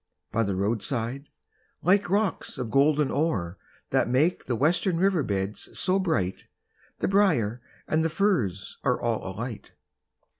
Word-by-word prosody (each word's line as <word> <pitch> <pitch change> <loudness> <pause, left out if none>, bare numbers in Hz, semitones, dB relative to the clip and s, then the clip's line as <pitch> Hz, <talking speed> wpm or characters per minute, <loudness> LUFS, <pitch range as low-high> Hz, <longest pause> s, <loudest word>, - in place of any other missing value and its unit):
By 115 - +1
the 100 -3 0
roadside, 115 +6 -1 0.5
like 195 +1 +3
rocks 200 -1 0
of 125 -4 -4
golden 145 +1 +3
ore 100 - -1 0.3
That - - +2
make 150 +9 +2
the 125 - -1
western 165 - +2
river 185 -2 +3
beds 100 -4 -3
so 185 +1 +1
bright, 155 - -1 0.5
The - - -1
briar 155 - +2 0.3
and 155 +1 +2
the 165 - +1
furze 155 - 0
are 125 -2 +1
all 115 -2 -1
alight! 115 +1 -6
135 Hz, 140 wpm, -26 LUFS, 110-175 Hz, 0.5 s, like